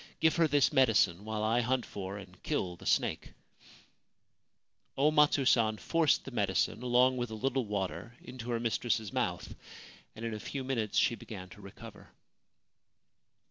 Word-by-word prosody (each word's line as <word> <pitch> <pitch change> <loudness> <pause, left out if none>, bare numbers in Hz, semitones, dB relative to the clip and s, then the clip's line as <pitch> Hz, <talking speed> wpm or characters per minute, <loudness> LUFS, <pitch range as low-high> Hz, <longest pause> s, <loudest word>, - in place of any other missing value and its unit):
Give 160 0 +3
her 165 -1 +4
this 145 -1 +3
medicine, 105 -7 +3
while 110 -1 -3
I 115 +3 +2
hunt 125 +1 0
for 100 0 -6
and 100 - -13
kill 90 -2 -2
the - - -10
snake/ - - 0 1.6
O 145 +3 +4
Matsu 150 -2 +4
San 110 -4 +3
forced 165 +4 +1
the - - -7
medicine, 110 - 0
along 125 +1 +3
with 120 -1 -2
a 110 - -6
little 130 +2 -1
water, 100 +2 -4
into 125 -2 -9
her 120 -1 0
mistress's 115 -2 -1
mouth, - - -2 0.6
and 115 +1 -7
in 115 - -3
a 105 - -5
few 135 +5 -5
minutes 120 -5 -2
she - - +4
began 95 -5 -9
to 105 - -14
recover. 105 +2 -12
115 Hz, 160 wpm, -31 LUFS, 105-130 Hz, 1.6 s, her